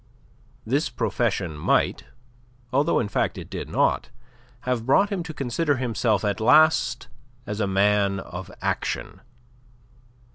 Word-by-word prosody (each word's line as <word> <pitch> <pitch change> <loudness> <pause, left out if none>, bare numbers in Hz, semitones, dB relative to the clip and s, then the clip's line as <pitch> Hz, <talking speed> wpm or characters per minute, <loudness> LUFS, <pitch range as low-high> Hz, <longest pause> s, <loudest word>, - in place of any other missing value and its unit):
This - - 0
profession 85 -5 -1
might 75 - +1 0.7
although 140 +3 +2
in 110 - -1
fact 100 - -1
it - - -9
did - - -5
not - - +1 0.5
have 125 -2 -2
brought 200 +10 +4
him 195 -3 -1
to 165 -1 -6
consider 145 +2 -1
himself 115 -4 0
at 100 -2 -1
last 155 +8 +4 0.4
as 105 +1 -4
a 100 - +1
man 100 0 +2
of 90 -1 -8
action. - - -3
110 Hz, 130 wpm, -24 LUFS, 100-140 Hz, 0.7 s, brought